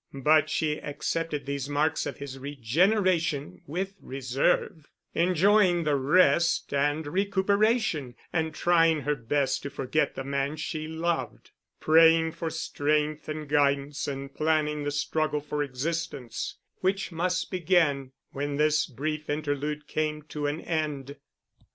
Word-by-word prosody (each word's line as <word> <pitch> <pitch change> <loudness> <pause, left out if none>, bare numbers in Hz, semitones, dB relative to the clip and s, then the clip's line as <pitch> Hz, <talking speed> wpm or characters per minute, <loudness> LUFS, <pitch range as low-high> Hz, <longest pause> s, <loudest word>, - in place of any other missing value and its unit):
But 155 +1 +5
she 150 -1 -1
accepted 150 +1 -3
these 140 0 -3
marks 150 +2 +1
of - - -5
his 135 -1 -7
regeneration 150 - +1
with 190 +6 -3
reserve, 135 +4 -1 0.3
enjoying 185 +1 +3
the 150 -2 +2
rest 150 +4 +3
and 145 +2 +1
recuperation 200 - +1 0.2
and 160 -1 0
trying 165 -1 +3
her 145 +2 0
best 140 +1 0
to 140 - -5
forget 140 +2 -1
the 135 - -4
man 140 +2 -1
she 155 0 -4
loved, 165 +1 -3 0.3
praying 165 +1 +5
for 165 0 -4
strength 150 -1 -1
and 155 -1 -4
guidance 140 0 +1
and 140 0 -5
planning 155 -1 0
the - - 0
struggle 150 +1 0
for 150 0 -3
existence 140 -2 -3 0.2
which 195 +1 -1
must 175 +1 -1
begin 160 -7 +2 0.2
when 145 +1 -3
this 155 +1 +2
brief 155 +3 -4
interlude 150 0 -2
came 150 0 -2
to 150 -1 -4
an 145 +2 -2
end. 145 -4 -3
150 Hz, 130 wpm, -27 LUFS, 140-165 Hz, 0.3 s, But